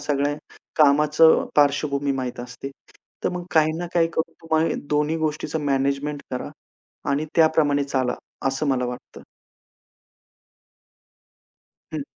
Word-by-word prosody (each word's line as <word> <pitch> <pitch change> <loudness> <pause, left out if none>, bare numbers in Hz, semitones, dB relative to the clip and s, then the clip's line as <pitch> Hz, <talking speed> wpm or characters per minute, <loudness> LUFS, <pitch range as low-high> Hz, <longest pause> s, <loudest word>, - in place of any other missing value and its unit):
सगळ्या 145 0 0 0.4
कामाचं 150 +2 +5
पार्श्वभूमी 145 -1 +2
माहीत 130 -2 -4
असते. 125 +2 -8 0.5
तर - - +3
मग 180 -1 -4
काही 155 -1 +4
ना 175 - -3
काही 165 -1 +3
करून 160 - -1
तुम्हाला 160 0 +1 0.2
दोन्ही 150 +2 +1
गोष्टीचं 155 +1 -3
मॅनेजमेंट 140 +1 0
करा 125 - -4 0.6
आणि 145 +2 0
त्याप्रमाणे 155 -3 +3
चाला 130 -3 0 0.3
असं 135 +3 -2
मला 130 -2 +1
वाटतं. 125 0 -8 2.7
हं. 155 -2 -3
145 Hz, 115 wpm, -23 LUFS, 140-155 Hz, 2.7 s, कामाचं